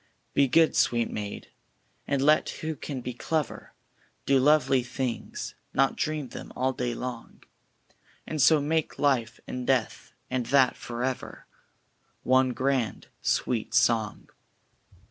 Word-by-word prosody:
Be 140 - +4
good, 160 +5 +4
sweet 120 -1 +2
maid, 105 -1 -6 0.6
and 140 -1 +1
let 155 +2 +4
who 160 0 -4
can 135 -1 -6
be 125 +1 -5
clever; 155 +5 -3 0.5
Do 135 -1 +4
lovely 135 -2 +4
things, 125 0 -4 0.2
not 135 0 +3
dream 150 -4 -2
them, - - -9
all 130 +1 0
day 120 -2 -2
long; 125 -2 -7 0.8
And 155 -2 -2
so 155 +3 +6
make 155 +2 -1
Life, 125 -5 +1
and 125 -1 -5
Death, 130 -4 0
and 125 -2 -2
that 135 0 +4
For 120 0 -5
Ever, 130 -1 -4 0.8
One 130 0 +4
grand 130 -3 -1
sweet 115 -3 0
song. 110 -3 +2
130 Hz, 130 wpm, -27 LUFS, 120-140 Hz, 0.8 s, so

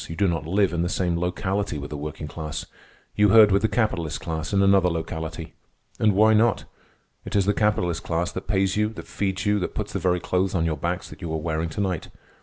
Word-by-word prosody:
You 80 - -5
do 100 +4 +2
not 80 -3 -2
live 95 +1 +2
in 85 - 0
the 85 - 0
same 90 -2 0
locality 95 0 -2
with 70 0 -7
the - - -4
working 75 +1 -6
class. 75 0 -5 0.5
You 105 0 +4
herd 105 0 +7
with 100 +1 +3
the 110 - +3
capitalist 95 -8 -1
class 80 0 -4
in 100 -1 +3
another 95 -2 +4
locality. 80 0 -5 0.5
And 105 -2 +4
why 110 +2 +5
not? 110 +1 +3 0.6
It - - -6
is 100 -2 +3
the 105 - +2
capitalist 95 -6 +1
class 85 +1 -1
that 95 - -7
pays 95 -2 +1
you, 105 0 +1
that - - -9
feeds 95 -2 -2
you, 105 0 +2
that 90 - -4
puts 105 -2 -4
the 100 - -1
very 90 0 +1
clothes 95 +2 0
on 85 -2 +1
your 80 -1 0
backs 85 +5 -3
that - - -12
you 85 -3 -4
are 80 - -1
wearing 80 +1 -2
to 90 - -3
night. 95 -5 -2
90 Hz, 235 wpm, -24 LUFS, 80-100 Hz, 0.6 s, herd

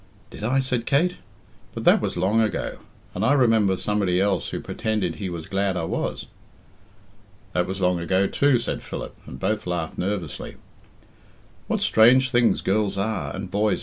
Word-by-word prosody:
"Did - - -9
I?" 125 +5 +1
said 130 -3 0
Kate. 170 +6 +2 0.6
"But - - -4
that - - +5
was - - -2
long 100 +6 +2
ago. 110 - -2 0.3
And 95 - -3
I 125 - +4
remember 110 -8 +3
somebody 100 -4 0
else 95 -2 +1
who - - -4
pretended 100 -7 -2
he 95 - -4
was 85 -2 -6
glad 95 -1 0
I 85 - -2
was." - - -3 1.3
"That 90 0 +1
was 95 +1 -4
long 90 -1 +2
ago 95 +3 +1
too," 140 +5 +3
said 120 - -3
Philip, - - -7
and 65 - -9
both 105 +3 -1
laughed 85 -2 -3
nervously. 95 -3 -3 1.1
"What - - 0
strange 125 +4 +5
things 120 -1 +3
girls 100 0 0
are 110 +3 -2
and 95 -1 -6
boys!" 105 +1 +1
100 Hz, 170 wpm, -24 LUFS, 90-115 Hz, 1.3 s, that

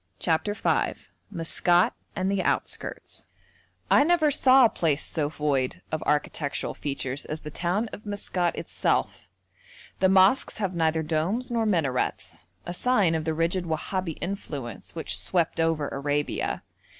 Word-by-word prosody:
] - - -43
CHAPTER 165 +5 0
V - - 0 0.3
MASKAT 175 -1 +2 0.2
AND 185 +1 0
THE 200 -1 +1
OUTSKIRTS - - -3 0.6
I - - +7
never 315 -2 +3
saw 265 -2 +6
a - - +5
place 155 -7 0
so 150 -3 -1
void 145 -4 -1
of 155 - -2
architectural 150 0 -1
features 140 -1 -3
as 155 +1 -5
the 150 - -8
town 185 +9 -1
of 210 - -8
Maskat 185 -4 -1
itself. - - -1 0.7
The 190 - +4
mosques 190 +7 +4
have 195 -4 -1
neither 160 -1 +1
domes 170 +11 -1
nor 230 -2 +1
minarets 145 - -1 0.2
a 175 - -4
sign 205 -4 +2
of 160 -1 -1
the 160 -1 -1
rigid 170 +3 0
Wahabi 165 +1 -2
influence 145 - -6
which - - -2
swept 170 -3 +1
over 165 -3 +1
Arabia. 145 +1 -2
165 Hz, 145 wpm, -26 LUFS, 155-195 Hz, 0.7 s, I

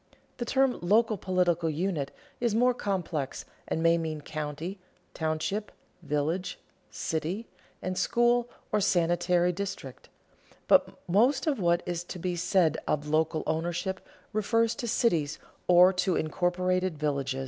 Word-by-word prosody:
The 240 - -3
term 265 +1 +2
local 215 +5 +3
political 180 -3 +1
unit 155 -3 -1 0.3
is 235 -3 +1
more 250 +2 +4
complex 180 - -3 0.2
and 160 - -1
may 165 0 +4
mean 155 -2 -3
county, 155 +6 -5 0.3
township, 160 +7 -2 0.3
village, 155 +4 -2 0.3
city, 165 +8 -3 0.4
and 185 0 -2
school 240 +3 +2 0.2
or 210 - +2
sanitary 175 -1 +2
district; 185 -8 -6 0.6
but - - +4
most 240 +10 +3
of 290 -7 0
what 170 -1 +2
is 175 -1 -3
to 180 - -7
be 180 0 -2
said 175 -2 +2
of 150 0 -1
local 155 0 +1
ownership 175 +4 -2 0.3
refers 230 +2 +2
to 240 - -3
cities 170 - +1 0.3
or 180 +1 +7
to 180 -1 +1
incorporated 180 +1 0
villages. 140 -3 -1
180 Hz, 130 wpm, -28 LUFS, 160-200 Hz, 0.6 s, or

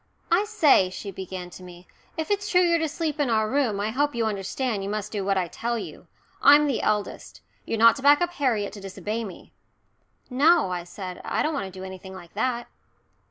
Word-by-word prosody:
"I 370 +5 +4
say," 315 - +4
she 195 +2 -7
began 185 -1 -7
to - - -11
me, 180 0 -13 0.3
"if 320 +4 -3
it's 405 0 0
true 360 -3 +4
you're 340 -1 +3
to 320 - 0
sleep 310 0 -3
in 285 -4 +1
our 220 -1 +2
room 245 -5 0
I 210 +2 -1
hope 285 +2 0
you 230 -1 0
understand 210 +2 -2
you 195 - -4
must 210 0 -3
do 205 -2 -2
what 195 0 +1
I 180 -2 0
tell 235 +7 -3
you. - - -8 0.3
I'm 290 +1 +7
the 275 -5 0
eldest. 210 -1 -2 0.3
You're 225 - -1
not 230 +2 +6
to - - -7
back 290 +1 +6
up 350 0 0
Harriet 235 -10 0
to 205 - -9
disobey 210 +4 -4
me." 195 -5 -10 0.7
"No," 280 - +3
I 175 -1 -3
said. 180 0 -8
"I - - -1
don't 315 - 0
want 195 -10 -3
to 185 - -11
do - - -7
anything 190 0 -9
like 175 -2 -12
that." 240 +2 -1
220 Hz, 220 wpm, -25 LUFS, 190-290 Hz, 0.7 s, I'm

